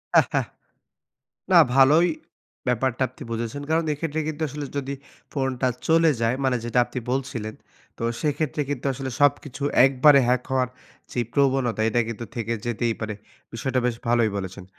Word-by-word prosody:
হ্যাঁ, - - +7
হ্যাঁ। - - +1 1.1
না, - - +7 0.2
ভালোই 145 +6 +6 0.6
ব্যাপারটা 125 +1 0
আপনি - - -12
বুঝেছেন। 115 +4 -3
কারণ, 160 +1 +2
এক্ষেত্রে 155 +1 -3
কিন্তু 155 0 -5
আসলে 145 +2 -5
যদি 140 0 -3 0.4
ফোনটা 135 -2 0 0.2
চলে 165 0 +5
যায় 115 +2 +2
মানে 130 -2 +2
যেটা 120 +1 +1
আপনি 125 - -5
বলছিলেন 125 -5 -3 0.4
তো - - -5 0.2
সেইক্ষেত্রে 150 -1 -1
কিন্তু 140 -3 -4
আসলে 135 0 -5
সবকিছু 145 -1 +1 0.2
একবারে 140 +2 +6
হ্যাক 125 0 +2
হওয়ার 130 -1 +1 0.4
যেই 120 -1 -1
প্রবণতা, 135 -5 +2
এটা 120 +2 +2
কিন্তু 115 +1 -5
থেকে 115 -1 -2
যেতেই 120 0 0
পারে। 110 -1 -3 0.4
বিষয়টা 130 +3 -1
বেশ 125 -2 0
ভালোই 120 -2 +3
বলেছেন। 95 0 -6
130 Hz, 155 wpm, -24 LUFS, 120-140 Hz, 1.1 s, হ্যাঁ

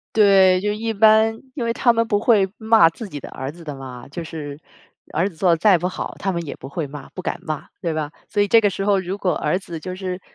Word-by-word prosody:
对， 195 -3 +6
就 205 +2 -1
一 225 +2 -2
般， 220 +1 +4
因 245 - -3
为 230 - 0
他 240 +1 +3
们 230 0 +1
不 205 -2 +1
会 205 -3 +3
骂 220 -6 +5
自 215 +6 -8
己 150 -5 -7
的 - - -9
儿 135 +2 -6
子 170 +2 -14
的 150 -3 -6
嘛， 130 -2 -9
就 165 +4 -6
是 150 -3 -7 0.6
儿 170 +5 +1
子 175 - -15
做 180 +2 +2
得 165 - +4
再 185 +2 +4
不 175 - -2
好， 185 - -5
他 195 - -1
们 170 -1 -3
也 145 - -7
不 135 - -10
会 145 +1 -4
骂、 140 -1 -9
不 185 - -8
敢 - - -3
骂， 155 -2 -5
对 170 -4 -2
吧？ 155 -2 -3 0.2
所 205 - +1
以 205 - 0
这 230 - +6
个 210 - +3
时 195 +1 -4
候 200 -1 +3
如 185 +1 -3
果 185 -3 0
儿 150 +3 0
子 175 -3 -6
就 185 +3 -6
是 185 -1 -5
185 Hz, 290 characters per minute, -21 LUFS, 160-210 Hz, 0.6 s, 对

